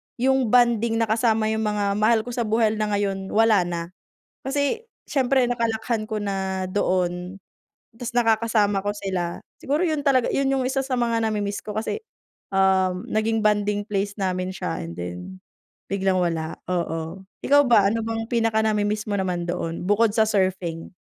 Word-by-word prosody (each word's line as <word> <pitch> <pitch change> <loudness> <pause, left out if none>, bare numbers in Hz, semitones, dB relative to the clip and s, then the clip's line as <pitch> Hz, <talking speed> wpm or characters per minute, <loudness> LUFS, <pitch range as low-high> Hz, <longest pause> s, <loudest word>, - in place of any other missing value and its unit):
yung 265 0 +2
bonding 235 -1 +3
na 225 -1 0
kasama 220 -1 +2
yung 220 0 -1
mga 205 -1 0
mahal 220 +1 +3
ko 245 - -7
sa 235 -2 -2
buhay 220 0 +2
na 215 - 0
ngayon 195 -1 -2
wala 215 -5 +4
na. 170 -1 -3 0.6
Kasi 285 - -1 0.2
siyempre 260 -2 +2
nakalakihan 230 -2 -1
ko 215 -1 -3
na 190 -2 -2
doon 185 -1 -1 0.6
tapos 245 0 -5
nakakasama 220 -3 +2
ko 205 0 -1
sila. 185 -4 -3 0.2
Siguro 290 +5 -1
'yon 310 -4 -1
talaga 260 -3 +3
'yon 275 - +1
yung 270 -1 +1
isa 265 +1 -1
sa 265 - -1
mga 235 -2 +1
namimiss 205 -2 -1
ko 210 - -6
kasi, 220 - -2 0.6
um, 190 -1 +2
naging 220 +1 +1
bonding 210 -1 +1
place 200 0 -1
namin 185 -1 -1
siya - - -3
and 85 - -7
then 90 - -7 0.5
biglang 195 -1 +1
wala, 165 -3 -1
oo. 170 0 -3 0.2
Ikaw 285 +1 +6
ba, 205 -4 +6
ano 225 +1 -1
bang 225 0 -3
pinaka-namimiss 220 -2 +1
mo 205 - 0
naman 180 -2 -1
doon 170 -1 -3
bukod 205 +3 +3
sa 220 - +4
surfing? 185 -5 -1
210 Hz, 165 wpm, -24 LUFS, 190-230 Hz, 0.6 s, Ikaw